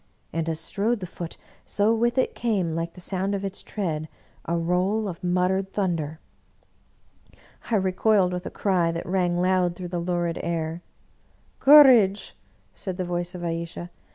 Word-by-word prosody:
And, 165 0 -1
as 160 -1 -2
strode 215 +7 -1
the 185 - -5
Foot, 170 -1 -8 0.3
so 210 +2 +1
with 235 +2 +1
it 260 - +1
came, 200 -8 -1
like 165 +1 -3
the - - -13
sound 190 +2 -2
of 200 0 -3
its 195 0 -5
tread, 160 -7 -3 0.4
a 170 +1 0
roll 180 +6 0
of 175 -2 -7
muttered 185 +2 0
thunder. 165 -6 -2 1.5
I 230 - +2
recoiled, 190 0 +2
with 180 +1 -4
a - - -3
cry 180 -4 +1
that 165 0 -5
rang 180 -1 0
loud 180 -1 +2
through 180 0 -7
the 175 0 -2
lurid 175 -1 -1
air. 165 0 -3 0.4
" - - -37
Courage! 255 -9 +6 0.2
" - - -38
said 185 -2 -6
the 185 - -2
voice 175 0 -3
of 175 - -6
Ayesha. 170 +1 -4
180 Hz, 170 wpm, -25 LUFS, 170-195 Hz, 1.5 s, Courage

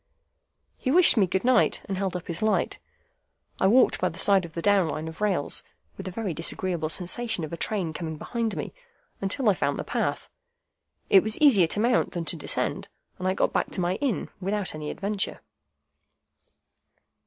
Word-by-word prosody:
He 260 - -2
wished 345 +5 +7
me 200 -5 +3
good 190 +1 -1
night, 255 -2 +3
and 195 - -3
held 190 -1 -2
up 180 - -5
his 170 -1 -2
light. 215 0 0 0.8
I 190 - +3
walked 250 +6 +4
by - - +2
the 165 - -11
side 195 -1 +4
of 165 - -12
the 170 - -3
down 200 -4 +4
Line 155 +1 -4
of 160 +4 -9
rails 195 -8 +1 0.3
(with - - -8
a - - -2
very 195 -1 -3
disagreeable 165 0 -2
sensation 185 +3 -2
of 155 - -6
a - - -1
train 175 -2 -2
coming 160 -1 -5
behind 230 +4 -3
me) - - -5 0.5
until 210 +6 -1
I 205 - +6
found - - -1
the - - -3
path. - - -2 0.8
It 195 - +8
was 215 +2 0
easier 230 - +5
to 205 - -1
mount 240 +2 +2
than 170 -3 -3
to 170 - -1
descend, 155 - -2 0.3
and 185 - -2
I 185 - +1
got - - +1
back - - 0
to - - -1
my 180 +2 0
inn 270 -7 -2
without 200 +1 -2
any 155 -1 -5
adventure. 200 0 -3
190 Hz, 190 wpm, -26 LUFS, 170-215 Hz, 0.8 s, It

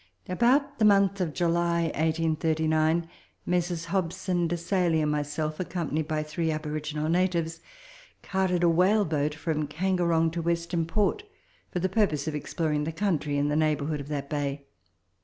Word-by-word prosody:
About 270 +9 +2
the 215 - +4
month 200 -1 +4
of 170 -4 0
July 170 +1 +1
1839, 160 0 +1 0.4
Messrs. 175 -1 -1
Hobson, 180 -1 -1
Desailly, 170 0 +1
and 150 -1 +1
myself, 150 +1 -2
accompanied 165 -4 -2
by 155 -1 -1
three 155 +2 -2
aboriginal 155 0 -3
natives, 170 -1 0 0.6
carted 185 -2 0
a - - +5
whale 185 +5 +4
boat 150 -1 -1
from 155 -2 -2
Kangerong 170 0 +1
to 170 +1 -3
Western 170 0 -1
Port, 210 - +1 0.5
for - - -4
the 180 +1 +1
purpose 185 -7 +1
of 155 - -1
ex 150 - -5
ploring 150 -3 0
the 160 - -2
country 160 -6 -1
in 145 +1 +1
the 150 - 0
neighbourhood 155 -1 +1
of 140 - -7
that 145 -2 -3
bay. 140 -1 -3
165 Hz, 155 wpm, -27 LUFS, 155-180 Hz, 0.6 s, a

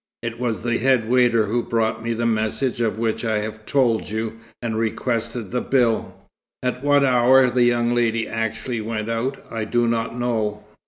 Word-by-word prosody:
It 115 0 -4
was 120 -3 -2
the 120 0 0
head 130 -3 +2
waiter 120 -2 +3
who 115 +4 0
brought 110 -1 -1
me 115 0 -1
the 115 +1 -2
message 115 +3 0
of 110 -2 0
which 115 0 -1
I 110 -2 0
have 110 +1 -5
told 120 -5 +1
you, 110 +1 -4 0.2
and 115 -2 -3
requested 115 0 -2
the 125 0 0
bill. 120 -4 +1 0.5
At 125 +1 -2
what 145 -1 +4
hour 130 0 +5
the 120 0 +3
young 120 0 +2
lady 115 -2 +1
actually 115 +1 -3
went 110 0 -3
out, 125 +4 -3
I 115 -1 -3
do 120 +2 +1
not 115 0 -1
know. 110 -4 -1
115 Hz, 180 wpm, -22 LUFS, 110-120 Hz, 0.5 s, hour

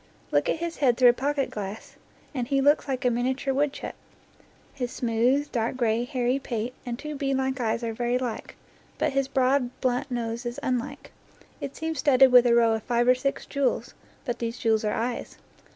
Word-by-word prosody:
Look - - +2
at - - +2
his 335 0 -4
head 245 -4 +3
through 250 -1 +7
a - - +5
pocket 275 +1 -1
glass, 205 0 -7 0.4
and 250 -4 -2
he 275 +1 +1
looks 290 +2 +3
like 265 -1 -2
a 250 - +4
minia 245 +2 0
ture 275 -1 -1
woodchuck. 285 +1 -1 0.8
His 250 -3 -4
smooth, 245 +5 +1
dark 235 +1 -1
gray, 235 -1 +1
hairy 250 +1 0
pate 240 -2 -3
and 235 -1 -3
two 300 +2 -6
beadlike 270 -1 -1
eyes 230 0 -1
are 230 -1 -2
very 240 +2 0
like; 245 -3 -5 0.4
but - - 0
his 275 -1 +1
broad, 265 -1 +2
blunt 255 +2 0
nose 235 -1 -3
is 240 -1 -4
unlike. 260 +3 -3 0.5
It 275 - -6
seems 320 -2 -3
studded 265 -3 +5
with 250 -1 +7
a 235 - +4
row 230 -1 +4
of 220 - -1
five 240 +1 +1
or 250 - +7
six 265 +2 -2
jewels; 280 -2 -1 0.3
but 240 -2 -3
these 230 +1 -3
jewels 225 -3 +1
are 210 - 0
eyes. 235 +1 -3
250 Hz, 200 wpm, -26 LUFS, 235-275 Hz, 0.8 s, through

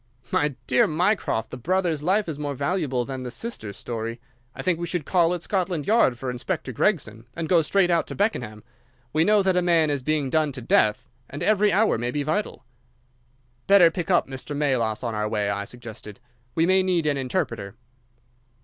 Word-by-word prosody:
"My 145 -2 +1
dear 125 - +3
Mycroft, 160 - 0
the - - -6
brother's 170 +2 0
life 195 +6 +1
is 155 -3 -5
more 145 -1 -3
valuable 140 -4 -1
than 130 0 -5
the 125 - -5
sister's 120 - -6
story. 115 0 -5 0.4
I - - -6
think 180 -3 +1
we 170 - -3
should 175 -5 -3
call 175 0 +2
at 175 - -7
Scotland 180 -6 -1
Yard 210 - +3
for 130 0 -4
Inspector 130 +3 -4
Gregson, 120 - -1
and 165 -1 -3
go 170 -1 +4
straight 180 +3 +2
out 170 -1 +1
to - - -6
Beckenham. 120 - -2 0.5
We 155 +1 +3
know 210 +2 +4
that 190 -1 +2
a 180 - +3
man 165 -3 +3
is 140 -2 -1
being 145 -1 -1
done 155 -3 +1
to 130 - -7
death, 110 +2 +2 0.2
and 145 - -5
every 210 -1 +3
hour 210 - +2
may 120 +1 -2
be 145 +3 -2
vital." 155 -2 -2 1.0
"Better 195 -4 +7
pick 175 0 -4
up 175 -2 +3
Mr. 135 +2 -5
Melas 120 -7 0
on 115 -2 -2
our 105 0 -1
way," 105 -2 0
I 100 0 -3
suggested. 110 -3 -10 0.4
"We 165 - +3
may 190 +1 +4
need 180 -3 +1
an 145 -2 +1
interpreter." 115 -5 -3
150 Hz, 195 wpm, -24 LUFS, 125-180 Hz, 1.0 s, Better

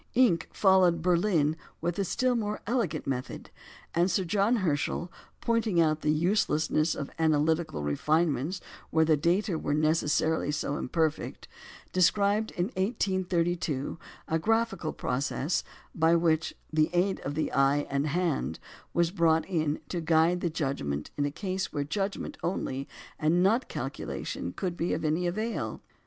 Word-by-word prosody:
Encke 225 -10 +4
followed 190 -3 +4
at 165 - -7
Berlin 170 -4 +2 0.2
with 175 +3 -2
a - - +2
still 250 +7 +1
more 215 -3 -2
elegant 230 -5 -1
method; 130 -2 -4 0.4
and 175 +2 +3
Sir 190 - +1
John 200 +6 +2
Herschel, 175 - -1 0.3
pointing 230 -6 +1
out 155 -1 +3
the - - 0
uselessness 155 -2 +1
of 140 - -5
analytical 155 - +1
refinements 150 - 0 0.3
where 160 0 +3
the 155 0 +4
data 170 +3 +1
were 145 - -1
necessarily 155 0 +1
so 145 -1 -1
imperfect, 155 +2 -2 0.5
described 200 +4 +3
in 175 +3 -2
1832 175 - -1 0.3
a 160 - +1
graphical 225 -4 0
process 140 +5 -1 0.3
by 165 +1 +3
which 165 -1 +1 0.2
"the 155 +1 +3
aid 185 +2 +1
of 145 - -4
the 155 - -1
eye 140 +1 +3
and 140 +2 0
hand" 155 - -1 0.4
was 170 -1 +2
brought 165 -3 +3
in 155 -5 -1
"to 175 - -2
guide 165 +2 +3
the 175 - 0
judgment 135 - -3
in 145 - 0
a 145 - -1
case 185 +2 -3
where 145 - -1
judgment 195 +7 -3
only, 140 -6 -2 0.3
and 165 +4 +3
not 225 +7 +2
calculation, - - -4
could 180 -3 -3
be 170 0 0
of 160 - -3
any 160 +4 +1
avail." 215 +6 -2
170 Hz, 145 wpm, -29 LUFS, 155-190 Hz, 0.5 s, Encke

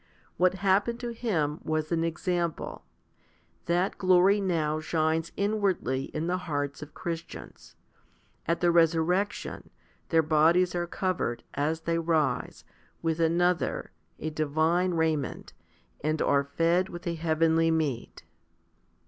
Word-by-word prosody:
What 185 +1 +3
happened 200 +5 +2
to 240 - -3
him 165 -11 -1
was 155 0 -2
an 165 -1 +1
example. 170 0 -2 0.8
That 175 +3 0
glory 185 +2 +4
now 160 -5 0
shines 160 +1 0
inwardly 195 - 0
in 155 +1 -4
the 180 +2 0
hearts 145 -1 -2
of 150 - -10
Christians; 165 -1 -7 0.7
at 170 +1 0
the 175 -1 +4
resurrec 170 +4 +3
tion, - - -8 0.4
their 165 -1 +4
bodies 165 +4 +3
are 175 -1 -1
covered, 170 -11 -2
as 155 +3 -1
they 165 0 0
rise, 160 -3 0 0.4
with 165 0 0
another, 170 -2 +1 0.3
a 155 - -4
divine, 160 +4 +1
raiment, 160 -4 -1 0.5
and 155 +1 0
are 140 0 +2
fed 170 +6 +1
with 175 0 -9
a 170 - -1
heavenly 165 0 +2
meat. 150 - -2
165 Hz, 125 wpm, -28 LUFS, 155-180 Hz, 0.8 s, glory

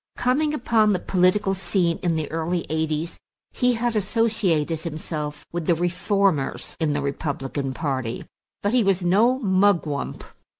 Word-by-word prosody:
Coming 285 +5 +1
upon 225 -5 +3
the 185 - 0
political 190 +3 +2
scene 175 -2 0
in 175 -3 +1
the 155 -1 -1
early 165 +2 -1
eighties, 160 +1 -2 0.3
he 250 -1 +2
had 235 0 -1
associated 200 -7 +1
himself 155 -2 -5
with 170 -2 -4
the 170 - +4
reformers 175 -2 0
in 155 -3 +1
the 145 -1 -1
Republican 140 -1 -3
party; 130 -4 -3 0.4
but 205 +3 +1
he 250 -2 +4
was 195 -2 +1
no 215 +9 +4
Mugwump. 190 - +1
175 Hz, 140 wpm, -24 LUFS, 155-205 Hz, 0.4 s, the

